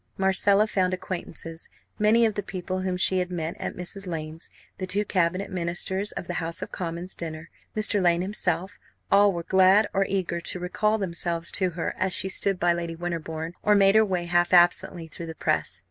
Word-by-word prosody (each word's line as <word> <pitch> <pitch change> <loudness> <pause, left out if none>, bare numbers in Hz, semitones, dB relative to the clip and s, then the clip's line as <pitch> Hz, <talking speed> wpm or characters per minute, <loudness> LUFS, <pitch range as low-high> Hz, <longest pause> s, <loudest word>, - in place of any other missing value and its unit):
Marcella 195 +2 +3
found 185 -3 0
acquaintances. 165 -3 -6 0.3
Many 220 +2 +4
of 220 - +1
the 205 - -3
people 185 -1 -5
whom 185 -1 -2
she 185 0 +4
had 180 0 -2
met 170 -2 -4
at - - -4
Mrs. 185 +2 -4
Lane's, 160 -1 -6 0.3
the 185 - -3
two 200 +3 0
Cabinet 185 +1 0
Ministers 185 +3 -1
of - - -5
the - - -3
House 165 +1 -3
of - - -8
Commons 175 +1 -5
dinner, 160 -1 -7 0.3
Mr. 210 -1 +2
Lane 175 -1 +3
himself 185 -2 -1 0.3
all 200 0 +6
were 170 -2 -4
glad 190 +4 +5
or 195 0 +1
eager 185 -3 -1
to 180 - -2
recall 210 +4 0
themselves 170 -3 -1
to 185 -2 +1
her 165 - -2
as 185 0 0
she 190 - 0
stood 195 0 0
by 175 0 +3
Lady 170 -1 -4
Winterbourne, 165 -1 -4
or 210 - +3
made 195 -1 +5
her 220 0 +6
way 185 -4 -1
half 175 +1 +1
absently 175 -1 +4
through 165 +1 -8
the 160 - -7
press. - - -1
180 Hz, 195 wpm, -25 LUFS, 170-195 Hz, 0.3 s, all